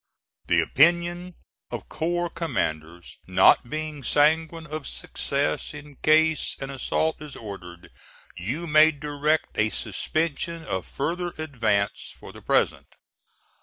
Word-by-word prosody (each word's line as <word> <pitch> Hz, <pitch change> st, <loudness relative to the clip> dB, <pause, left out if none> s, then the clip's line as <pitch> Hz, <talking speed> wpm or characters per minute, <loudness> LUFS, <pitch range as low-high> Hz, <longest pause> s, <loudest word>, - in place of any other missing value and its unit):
The -, -, +4 dB
opinion 175 Hz, +4 st, +2 dB, 0.3 s
of -, -, -6 dB
corps 175 Hz, +1 st, -1 dB
commanders 85 Hz, -, -3 dB
not 95 Hz, +6 st, +5 dB
being 155 Hz, 0 st, -4 dB
sanguine 160 Hz, +4 st, +2 dB
of 155 Hz, -1 st, -6 dB
success 140 Hz, +1 st, -2 dB
in 145 Hz, -2 st, -11 dB
case 160 Hz, 0 st, +3 dB
an 135 Hz, 0 st, -5 dB
assault 155 Hz, +4 st, -1 dB
is 150 Hz, -2 st, -8 dB
ordered, 90 Hz, -5 st, -9 dB, 0.4 s
you 125 Hz, -, -4 dB
may 155 Hz, 0 st, +6 dB
direct 150 Hz, +1 st, -1 dB
a 110 Hz, 0 st, +3 dB
suspension 155 Hz, -, -2 dB
of 95 Hz, -, -3 dB
farther 175 Hz, +5 st, -3 dB
advance 115 Hz, -10 st, -1 dB
for -, -, -10 dB
the -, -, -12 dB
present. -, -, +1 dB
150 Hz, 120 wpm, -25 LUFS, 120-160 Hz, 0.4 s, may